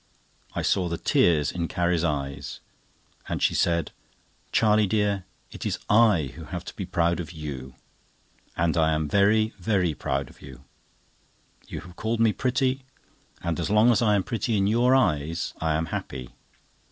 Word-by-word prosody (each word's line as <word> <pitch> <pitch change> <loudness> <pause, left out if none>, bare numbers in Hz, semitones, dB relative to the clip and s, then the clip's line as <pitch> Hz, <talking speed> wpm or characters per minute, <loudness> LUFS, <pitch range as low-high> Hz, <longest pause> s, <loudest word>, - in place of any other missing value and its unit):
I - - -1
saw 90 -3 +1
the 85 - -2
tears 75 -4 +2
in 85 -1 -2
Carrie's 85 -1 0
eyes, 70 -4 -3 0.7
and - - -2
she - - +2
said: 85 -2 +1 0.6
"Charlie 105 -1 +4
dear, 100 -2 0 0.3
it - - -8
is - - -1
I 105 - +4
who - - -9
have - - -6
to - - -8
be - - -5
proud 85 0 +1
of 80 -3 -5
you. 70 -5 -7 0.8
And 85 -1 +1
I 80 -1 +3
am 75 0 -1
very, 105 +5 +3
very 90 -3 +1
proud 70 -2 -2
of - - -18
you. 65 -1 -12 1.0
You - - -6
have 85 +2 -14
called 110 +1 -1
me 115 -2 +4
pretty; 130 +2 0 0.6
and 85 0 -1
as 85 - -2
long 105 +3 +5
as 115 - +2
I 105 -3 +4
am 100 - +1
pretty 115 +1 -1
in 95 - +2
your 120 +5 +4
eyes, 80 - 0
I 80 -1 +1
am 80 +1 0
happy. 60 - -5
90 Hz, 170 wpm, -26 LUFS, 80-110 Hz, 1.0 s, long